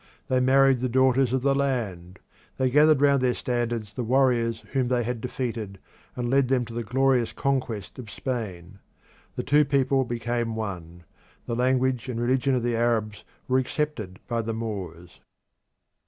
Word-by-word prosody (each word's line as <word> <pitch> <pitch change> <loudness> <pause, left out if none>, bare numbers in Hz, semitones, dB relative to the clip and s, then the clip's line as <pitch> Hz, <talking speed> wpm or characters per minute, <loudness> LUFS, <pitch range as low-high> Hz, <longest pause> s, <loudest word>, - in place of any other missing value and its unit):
They 130 - +3
married 135 0 +4
the 130 +1 -1
daughters 130 0 +3
of 130 -1 0
the 140 0 +3
land; 110 -10 -2 0.4
they 130 -1 +1
gathered 150 +1 +5
round 140 -2 +4
their 125 -1 +1
standards 120 -4 -2
the 125 - -3
warriors 120 -2 +2
whom 130 -3 0
they 120 -1 +1
had 120 0 -3
defeated, 115 -5 -4 0.4
and 125 -1 -2
led 135 +1 +3
them 125 -1 +1
to 115 - -10
the 120 - -3
glorious 125 +1 +1
conquest 130 -7 -2
of 115 -4 -8
Spain. 100 -6 -5 0.6
The - - -3
two 150 +2 +4
peoples 135 -2 +1
became 120 -1 -2
one; 90 -6 -6 0.4
the 115 - -3
language 130 0 +1
and 120 -2 -3
religion 130 +2 +1
of 125 - -1
the 120 -1 0
Arabs 115 -3 0 0.2
were 130 +1 +3
accepted 125 -8 -3
by 115 -1 -1
the 115 0 -4
Moors. 95 -6 -6
120 Hz, 165 wpm, -25 LUFS, 110-130 Hz, 0.6 s, gathered